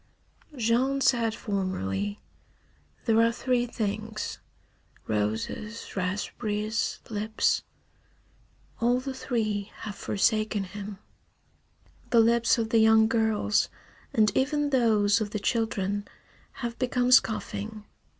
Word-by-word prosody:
Jean 250 +4 +2
said 230 -4 +2
formerly: 100 - -2 0.9
"There 225 0 +4
are 230 0 +4
three 245 +1 0
things: 215 -1 -3 0.7
roses, 110 - -3
raspberries, 210 +3 -2
lips." 215 +1 +1 1.2
All 245 +2 +3
the 265 +1 -5
three 215 -6 -2
have 210 - -5
forsaken 215 +1 0
him. 200 +1 -7 1.1
The 235 - +5
lips 235 +1 +4
of 225 -1 -1
the 230 - +5
young 220 0 +6
girls, 220 -2 +1 0.4
and 215 -2 +3
even 290 +2 +1
those 220 -5 +3
of 210 - -1
the 210 - -3
children, 205 -2 -1 0.5
have 235 -2 -5
become 250 0 +1
scoffing. 215 -3 +2
220 Hz, 100 wpm, -27 LUFS, 205-235 Hz, 1.2 s, young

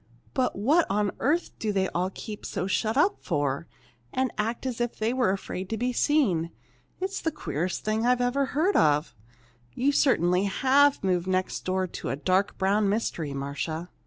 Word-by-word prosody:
But 255 -2 0
what 295 - +3
on 205 0 +1
earth 325 +5 +1
do 215 - -1
they 190 -2 +1
all 180 +2 -1
keep 210 +2 -8
so 180 - -3
shut 215 +5 0
up 385 +8 +3
for, 145 -2 -1 0.4
and 260 -2 0
act 230 +4 -2
as 245 -2 -2
if 240 -1 -1
they 220 +2 0
were 255 -5 +2
afraid 190 -1 -3
to 225 - -2
be 245 +3 -1
seen! 225 - +2 0.5
It's 385 +1 -3
the 325 - +1
queerest 175 - -3
thing 215 +1 0
I 245 +1 +5
ever 245 +3 +1
heard 325 +10 +1
of. 150 0 +3 0.6
You 275 +3 +2
certainly 180 - +3
have 270 +7 +3
moved 180 -2 +1
next 185 0 -1
door 185 0 0
to 180 - -6
a - - -1
'dark 185 +7 +1
brown 200 +2 +2
mystery,' 170 -9 -2
Marcia!" 145 +5 -4
205 Hz, 180 wpm, -27 LUFS, 180-255 Hz, 0.6 s, I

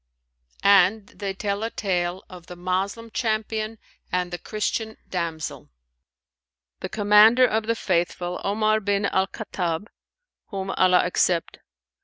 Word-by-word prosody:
And 200 +1 +4
they 195 -2 -5
tell 200 +1 -2
a 225 - -1
tale 180 -3 -2
of 180 -2 -12
THE 180 - -9
MOSLEM 190 +6 -2
CHAMPION 220 -1 -2 0.3
AND 180 0 -1
THE 175 - -4
CHRISTIAN 220 +1 -3
DAMSEL. 165 -4 -4 1.1
The - - -5
Commander 215 +4 +6
of 220 -2 0
the 230 - +1
Faithful, 175 -2 -1
Omar 215 +2 +2
bin 200 -1 0
al 190 -1 +1
Khattαb 180 -3 -4 0.6
(whom 195 -2 -4
Allah 185 -1 +4
accept!) 175 -1 0
200 Hz, 125 wpm, -24 LUFS, 180-215 Hz, 1.1 s, Commander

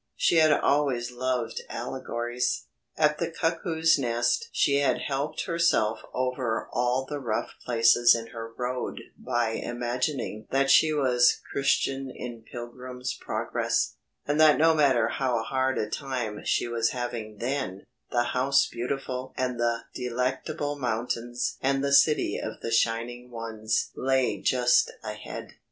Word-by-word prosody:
She 170 - +3
had 155 -1 +6
always 140 -5 +2
loved 125 -1 -2
allegories. 120 0 -3 0.3
At 150 -1 +3
the - - -1
Cuckoo's 165 -1 +1
Nest 120 -1 0
she 140 -1 +2
had 140 -1 +2
helped 140 +2 -2
herself 165 - +2
over 125 -3 -1
all 125 +2 +1
the 145 0 -4
rough 115 -5 -2
places 120 0 +5
in 115 0 -5
her 115 -1 -7
road 125 0 -3
by 120 -1 -1
imagining 120 0 -3
that 135 +1 +2
she 155 +2 +6
was 125 -5 +3
Christian 135 -1 0
in 120 -2 -7
"Pilgrim's 125 +1 -6
Progress," - - -1 0.3
and 150 +2 +1
that 155 -1 +7
no 160 +1 +5
matter 135 -7 +3
how 125 -2 0
hard 130 +3 0
a 105 - 0
time 120 -4 -4
she - - +1
was 115 -1 +1
having 120 -4 -5
then, 120 -5 -3 0.2
the 120 - +2
House 130 +3 +2
Beautiful 130 +1 -4
and 125 -2 -1
the 120 -1 0
Delectable 130 +4 -2
Mountains 120 0 -2
and 135 +1 +1
the 140 0 +1
City 150 +2 +4
of - - -6
the 115 - -3
Shining 115 +2 0
Ones 110 -2 -2
lay 130 -1 +1
just 125 -1 +3
ahead. - - -7
125 Hz, 140 wpm, -27 LUFS, 120-140 Hz, 0.3 s, that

